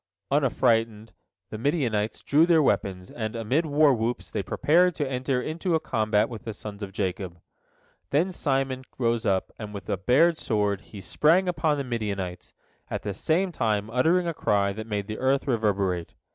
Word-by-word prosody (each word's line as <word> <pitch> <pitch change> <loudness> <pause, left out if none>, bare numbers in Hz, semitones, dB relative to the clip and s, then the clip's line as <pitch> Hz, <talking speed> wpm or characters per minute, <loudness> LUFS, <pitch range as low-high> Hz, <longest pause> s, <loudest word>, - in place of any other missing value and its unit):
Unaffrighted, 115 -6 +1 0.4
the 110 - -5
Midianites 115 -7 -1
drew 155 +4 +4
their 165 -3 +5
weapons, 95 -5 -1
and, 110 -1 -4
amid 130 +9 0
war 145 -1 +4
whoops, 115 +1 -2
they 105 - -1
prepared 170 - +2
to 145 - -1
enter 130 0 -1
into 165 +2 -1
a - - +2
combat 110 -7 +1
with 115 -3 -8
the 110 -2 -6
sons 105 0 -8
of 100 -1 -5
Jacob. 95 -3 -3 0.7
Then 165 +7 +2
Simon 135 -5 -1
rose 115 -2 0
up, 95 -1 0
and 105 -2 -7
with 100 - -6 0.2
bared 160 +6 +4
sword 105 -3 0
he 100 - -11
sprang 165 - +3
upon 160 -4 +1
the 140 - -2
Midianites, 100 -7 -4 0.3
at - - -4
the 100 - -3
same 175 - 0
time 110 -6 -1
uttering 165 +9 +3
a 170 - -1
cry 100 -8 +1
that 110 +2 -7
made 105 -2 -2
the 110 +1 -6
earth 135 +1 +1
reverberate. 100 -8 0
115 Hz, 170 wpm, -26 LUFS, 105-145 Hz, 0.7 s, their